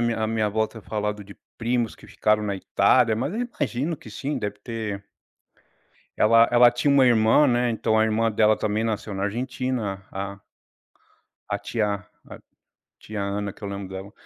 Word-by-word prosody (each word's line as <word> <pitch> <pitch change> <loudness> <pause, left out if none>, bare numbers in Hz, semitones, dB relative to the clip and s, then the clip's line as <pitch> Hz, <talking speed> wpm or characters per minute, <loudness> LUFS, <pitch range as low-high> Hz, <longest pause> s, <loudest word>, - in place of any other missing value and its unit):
minha 120 -1 0
a - - 0
minha 110 -1 0
avó 110 +1 +1
ter 110 - -12
falado 105 -1 -3
de 100 - -13 0.2
primos 120 0 0
que - - -16
ficaram 105 0 +1
na 100 -2 -2
Itália 115 +4 +3
mas 135 - -2
eu 230 - -2 0.2
imagino 145 +4 -1
que 110 - -13
sim, 140 +6 -3
deve 105 -3 -4
ter 105 -3 -5 1.1
ela 115 +1 +5
ela 120 0 +7
tinha 125 +4 +1
uma 135 -2 +5
irmã, 115 +4 +5
né, 120 -2 +2
então 110 -1 +1
a 110 - +4
irmã 110 +1 +1
dela 110 0 +3
também 110 +1 -1
nasceu 110 -2 -3
na 95 0 -2
Argentina, 120 -2 -3
a 100 0 -4
a 100 - -15 1.1
a - - -1
tia 105 -3 -1
a 100 0 -9 0.9
tia 105 -1 -6
Ana 100 0 -2
que - - -22
eu - - -3
lembro 100 -1 -6
dela. 95 +2 -7
110 Hz, 185 wpm, -24 LUFS, 105-120 Hz, 1.1 s, ela